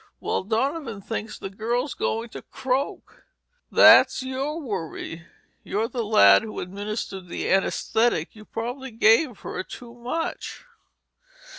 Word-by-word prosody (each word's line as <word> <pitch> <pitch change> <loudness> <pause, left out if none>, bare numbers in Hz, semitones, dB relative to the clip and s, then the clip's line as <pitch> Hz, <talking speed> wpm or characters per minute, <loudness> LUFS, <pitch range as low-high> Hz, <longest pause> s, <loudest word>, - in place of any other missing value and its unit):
"Well, - - -1
Donovan 230 - -1
thinks 215 +1 -5
the 195 - -7
girl's 240 +7 -2
goin' 225 +1 -2
to - - -8
croak." 265 +2 -3 0.5
"That's - - +7
your 270 +4 -3
worry. 170 - -5 0.4
You're 215 +3 -1
the 240 -2 -2
lad 100 - +6
who 215 - -6
administered 195 0 -5
the - - -4
anesthetic. 195 -1 +1
You 215 -1 -13
probably 245 +5 -5
gave 225 +2 +3
her - - -4
too 235 +5 -10
much." 250 - -4
225 Hz, 125 wpm, -25 LUFS, 200-255 Hz, 0.5 s, That's